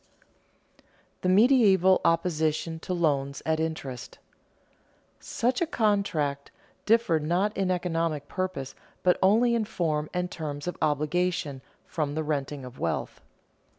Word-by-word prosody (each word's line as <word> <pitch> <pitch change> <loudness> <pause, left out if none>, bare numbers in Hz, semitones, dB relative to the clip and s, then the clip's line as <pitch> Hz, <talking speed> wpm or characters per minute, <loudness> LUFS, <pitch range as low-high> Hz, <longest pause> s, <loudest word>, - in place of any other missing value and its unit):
[Sidenote: - - -35 0.3
The 185 - +1
medieval 195 -4 +5
opposition 160 -1 0
to 185 - -7
loans 140 -6 0
at 160 0 +1
interest] 150 -6 -5 1.0
Such 250 +5 -1
a 340 - +2
contract 200 - 0 0.4
differed 215 -8 +3
not 180 +7 0
in 195 -1 0
economic 165 -5 -1
purpose, 185 -8 -4 0.3
but 180 - +3
only 225 +5 +4
in 230 -2 +1
form 155 -6 -1
and 180 0 -2
terms 145 -3 -5
of 180 - -3
obligation, 150 -1 0 0.2
from 150 -3 -3
the 160 - -1
renting 145 -2 -3
of 125 0 -11
wealth. 80 -1 -3
165 Hz, 125 wpm, -27 LUFS, 150-185 Hz, 1.0 s, medieval